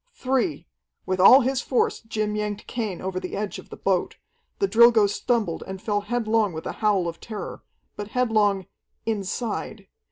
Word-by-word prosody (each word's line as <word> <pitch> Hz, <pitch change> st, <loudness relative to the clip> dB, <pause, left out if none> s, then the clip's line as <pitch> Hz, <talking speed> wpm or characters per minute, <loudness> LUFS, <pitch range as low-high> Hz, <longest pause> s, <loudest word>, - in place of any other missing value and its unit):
"Three!" 265 Hz, -, -1 dB, 0.4 s
With 185 Hz, 0 st, -1 dB
all 255 Hz, +9 st, +9 dB
his 265 Hz, +1 st, 0 dB
force 255 Hz, -, 0 dB
Jim 215 Hz, -1 st, -3 dB
yanked 210 Hz, -1 st, -3 dB
Cain 215 Hz, -7 st, -4 dB
over 185 Hz, 0 st, -2 dB
the 185 Hz, 0 st, -5 dB
edge 205 Hz, -1 st, -3 dB
of -, -, -14 dB
the -, -, -9 dB
boat. 185 Hz, -2 st, 0 dB, 0.4 s
The 395 Hz, -, +1 dB
Drilgo 235 Hz, -, +6 dB
stumbled 210 Hz, -4 st, -1 dB
and 190 Hz, 0 st, -6 dB
fell 205 Hz, 0 st, -1 dB
headlong 220 Hz, -2 st, 0 dB
with 160 Hz, -, -7 dB
a -, -, -2 dB
howl 200 Hz, -5 st, +2 dB
of 165 Hz, 0 st, -6 dB
terror. 215 Hz, -3 st, -7 dB, 0.3 s
But 205 Hz, -, -6 dB
headlong 215 Hz, -5 st, +1 dB, 0.4 s
inside. 215 Hz, 0 st, -3 dB
210 Hz, 165 wpm, -24 LUFS, 195-235 Hz, 0.4 s, all